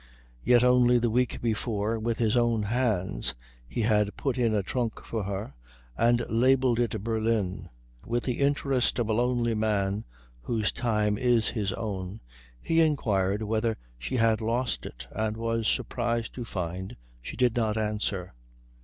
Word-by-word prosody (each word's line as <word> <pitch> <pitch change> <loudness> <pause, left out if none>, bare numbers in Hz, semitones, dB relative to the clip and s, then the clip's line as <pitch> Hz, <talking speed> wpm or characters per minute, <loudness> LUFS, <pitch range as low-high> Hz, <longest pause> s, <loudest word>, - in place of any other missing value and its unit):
Yet 120 -1 +5
only 125 -1 +5
the 120 -1 +1
week 125 +1 0
before 110 -1 -1
with 115 +1 -1
his 115 -1 +2
own 120 -3 +2
hands 105 - 0 0.3
he 115 - -3
had 105 -2 +2
put 135 -3 -1
in 120 -3 +2
a 105 -2 +1
trunk 120 +2 -2
for 110 -4 -3
her 100 -5 -4 0.4
and 120 - +3
labelled 125 +1 +3
it 110 -4 -1
Berlin. 110 -4 -1 0.3
With 120 +1 -1
the 125 - -2
interest 140 -2 +1
of 120 -3 0
a - - +2
lonely 120 0 +1
man 105 -2 0 0.4
whose 110 - 0
time 105 -3 0
is 120 -4 +3
his 105 -4 -1
own, 100 -2 -4 0.4
he 165 - +2
inquired 105 -10 +1
whether 110 +1 0 0.2
she 65 - -4
had 115 -2 +3
lost 120 +3 -1
it 60 +2 -9
and 110 0 -2
was 115 -1 -1
surprised 115 -1 -1
to 120 - -6
find 90 -1 -5 0.2
she - - -7
did 125 -2 +2
not 110 -2 +1
answer. 105 - -2
115 Hz, 155 wpm, -28 LUFS, 105-120 Hz, 0.4 s, Yet